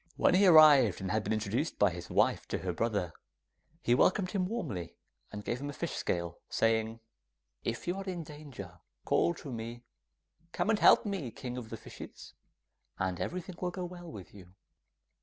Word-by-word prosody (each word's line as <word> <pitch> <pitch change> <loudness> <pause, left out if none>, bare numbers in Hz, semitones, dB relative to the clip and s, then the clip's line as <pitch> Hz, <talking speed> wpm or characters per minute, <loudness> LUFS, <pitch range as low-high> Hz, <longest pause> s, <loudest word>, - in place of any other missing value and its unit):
When - - +4
he 190 +2 +5
arrived 150 - +8
and 95 -1 -3
had 110 0 +1
been - - -3
introduced 110 +7 -1
by 100 -2 +4
his 85 0 -8
wife - - +2
to - - -2
her 90 -2 -3
brother, 100 -3 -1 0.7
he 120 - +3
welcomed 185 +8 +3
him 185 -3 0
warmly, 105 - -4 0.4
and 105 -1 -7
gave 120 - -2
him 145 - -4
a - - -5
fish - - -4
scale, 85 -1 -2
saying, 115 0 +1 0.6
'If 115 +7 -3
you 175 - 0
are 195 - -4
in 180 -3 -4
danger, 135 - -10 0.3
call 170 - +2
to 145 - -8
me, 115 +1 -6 0.7
"Come 225 - +1
and 215 - +2
help - - +6
me, 195 - -3
King 125 +2 -7
of 120 -3 -7
the 115 - -6
Fishes," - - -11 0.6
and 95 -2 -2
everything 180 0 -4
will 180 - 0
go 180 0 -5
well 175 -1 -9
with 95 -6 -10
you. 95 -2 -14
120 Hz, 185 wpm, -31 LUFS, -, 0.7 s, arrived